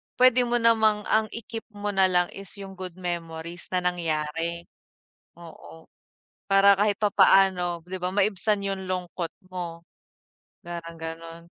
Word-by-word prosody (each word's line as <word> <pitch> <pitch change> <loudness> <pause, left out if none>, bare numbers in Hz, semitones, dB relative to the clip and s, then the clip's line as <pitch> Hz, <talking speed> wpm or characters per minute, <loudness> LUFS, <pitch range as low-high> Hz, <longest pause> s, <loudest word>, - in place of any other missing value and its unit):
pwede 250 -1 +5
mo 240 - 0
namang 220 -3 +3
ang 220 0 +2
i-keep 230 0 -7
mo 205 0 -3
nalang 185 -2 +3
is 195 0 -9
yung 195 -2 -10
good 185 -2 -7
memories 170 -1 -6
na 180 - +1
nangyari. 170 -1 -2 0.7
Oo, 155 - -14 0.6
para 195 0 +6
kahit 205 +1 +1
papaano 190 -4 +4
'di 185 - -4
ba 180 0 -3
maibsan 200 0 +1
yung 195 -1 -3
lungkot 180 -2 -4 0.2
mo, 175 -2 -6 0.8
parang 170 -2 -7
ganun. 165 +1 -8
185 Hz, 130 wpm, -26 LUFS, 170-200 Hz, 0.8 s, para